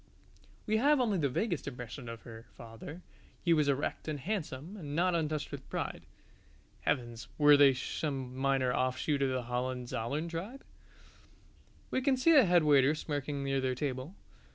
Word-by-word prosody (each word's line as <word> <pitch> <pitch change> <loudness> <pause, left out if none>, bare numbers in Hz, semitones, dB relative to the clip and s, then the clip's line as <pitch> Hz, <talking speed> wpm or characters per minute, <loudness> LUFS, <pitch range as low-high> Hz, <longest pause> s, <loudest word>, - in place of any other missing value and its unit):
We 215 +1 +2
have 285 +5 +4
only 215 -7 +1
the 140 -3 +1
vaguest 170 - -2
impression 125 -1 -7
of 115 -1 -8
her 115 0 -11
father: 115 +9 -10 0.4
he 170 - +4
was 150 -3 +3
erect 140 +2 -1
and 150 -2 -3
handsome 170 -1 -4
and 150 -7 -6
not 180 +2 +2
untouched 155 -3 -1
with - - -8
pride. - - -4 0.7
(Heavens, 120 -4 -2
were 145 -1 +7
they 140 -2 +6
some 135 -1 -3
minor 135 -1 +1
offshoot 130 +3 0
of 135 - +2
the 130 -1 -1
Hohenzollern 125 +3 -3
tribe?) 190 +11 -6 1.3
We 260 - +1
can 265 0 +2
see 295 +6 +4
the 285 -7 +7
head 175 -2 +4
waiter 145 -1 +5
smirking 145 -2 -3
near 135 -1 0
their 130 -1 0
table. 135 +5 -4
145 Hz, 160 wpm, -32 LUFS, 130-170 Hz, 1.3 s, were